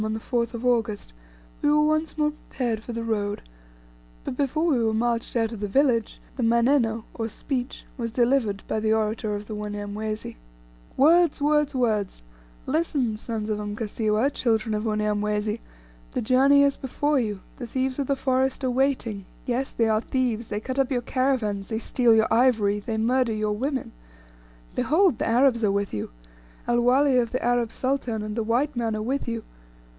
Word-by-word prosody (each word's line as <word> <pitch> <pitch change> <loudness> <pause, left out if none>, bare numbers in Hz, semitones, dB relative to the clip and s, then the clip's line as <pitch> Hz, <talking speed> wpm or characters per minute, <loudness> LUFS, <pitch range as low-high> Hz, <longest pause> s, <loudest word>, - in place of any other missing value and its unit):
on 215 0 -1
the 220 - -3
4th 235 0 -1
of 235 +2 -5
August 225 - 0 0.5
we 290 - +2
were 300 0 +4
once 310 +1 0
more 300 0 +2
prepared 240 -6 -4
for 240 - -8
the 230 0 -4
road, 205 -2 -1 0.8
but - - -4
before 285 +3 0
we 270 -9 +2
were 220 -1 +1
marched 235 +1 -1
out 225 -1 +1
of 225 - -7
the 205 - -2
village, 235 0 +1 0.2
the - - -2
"manneno," 235 -1 +2
or 225 -1 -3
speech, 255 +3 -4
was 230 -1 -2
delivered 235 -4 +1
by 220 - -1
the 215 0 +1
orator 215 -1 0
of 205 0 -6
the 215 - -7
Wanyamwezi: 210 - -5 0.6
"Words! 330 +3 +5
words! 295 -1 +2
words! 215 - 0 0.4
Listen, 280 -7 0
sons 215 -1 -4
of 210 - -1
Mkasiwa, 215 +4 -1
children 225 -4 0
of 210 +1 -2
Unyamwezi! 210 0 0 0.5
the - - -1
journey 275 +4 +5
is 280 -1 +2
before 290 +2 0
you, 210 -5 -2 0.2
the 245 - -6
thieves 260 +2 -2
of 275 - -1
the 275 - +2
forest 265 0 0
are 255 - +1
waiting; 245 -6 0 0.2
yes, 255 +2 -1
they 230 - +1
are 215 0 +2
thieves, 240 -3 -1
they 205 - -3
cut 260 +4 -4
up 270 -1 +2
your 245 -2 0
caravans, 235 -7 0
they 220 - -1
steal 235 0 +3
your 220 0 +3
ivory, 220 -4 +3
they 220 +2 -4
murder 240 +1 +2
your 215 -1 -1
women. 265 +4 -2 0.8
Behold, 330 - +2
the - - 0
Arabs 235 0 +3
are 205 - +3
with 200 0 -1
you, 105 - -3 0.6
El 240 0 +2
Wali 260 +2 +4
of 235 -2 0
the 255 - -2
Arab 240 -2 +1
sultan, 255 -5 -2
and 210 0 -5
the 230 - 0
white 245 +6 0
man 230 -2 -1
are 215 - -3
with 265 +4 -2
you. 230 -1 -3
235 Hz, 185 wpm, -25 LUFS, 215-265 Hz, 0.8 s, Words